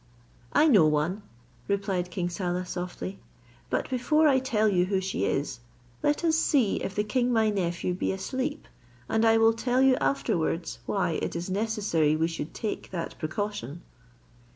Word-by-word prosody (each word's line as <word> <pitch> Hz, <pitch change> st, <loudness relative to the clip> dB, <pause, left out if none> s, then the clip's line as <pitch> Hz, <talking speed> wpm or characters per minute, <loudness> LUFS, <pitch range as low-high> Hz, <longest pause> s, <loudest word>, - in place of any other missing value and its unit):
"I 310 Hz, -, +5 dB
know 200 Hz, -, +6 dB
one," 155 Hz, +7 st, 0 dB, 0.5 s
replied 195 Hz, -3 st, -1 dB
king 175 Hz, 0 st, -2 dB
Saleh, 180 Hz, 0 st, -2 dB
softly; 180 Hz, +2 st, -5 dB, 0.5 s
"but -, -, -1 dB
before 300 Hz, +5 st, +2 dB
I 265 Hz, -3 st, +4 dB
tell 235 Hz, -5 st, +1 dB
you 180 Hz, -3 st, +3 dB
who 190 Hz, 0 st, 0 dB
she 190 Hz, +1 st, -2 dB
is, 135 Hz, -3 st, -1 dB, 0.4 s
let 295 Hz, +3 st, +1 dB
us 325 Hz, -2 st, +3 dB
see 280 Hz, -9 st, +2 dB
if 195 Hz, -, -4 dB
the 210 Hz, -, +1 dB
king 245 Hz, +3 st, 0 dB
my 220 Hz, -2 st, +3 dB
nephew 180 Hz, -2 st, -1 dB
be 180 Hz, -, -1 dB
asleep, 260 Hz, +9 st, -3 dB, 0.4 s
and 220 Hz, 0 st, +1 dB
I 225 Hz, 0 st, +5 dB
will 225 Hz, 0 st, +5 dB
tell 245 Hz, +2 st, 0 dB
you 265 Hz, -1 st, +5 dB
afterwards 140 Hz, +4 st, -1 dB
why 180 Hz, -5 st, 0 dB
it -, -, -3 dB
is 175 Hz, +2 st, -4 dB
necessary 200 Hz, -7 st, +1 dB
we 160 Hz, +1 st, +1 dB
should 165 Hz, -2 st, -5 dB
take 215 Hz, -, -4 dB
that 170 Hz, -3 st, -5 dB
precaution." 170 Hz, -, -4 dB
195 Hz, 165 wpm, -27 LUFS, 170-225 Hz, 0.5 s, know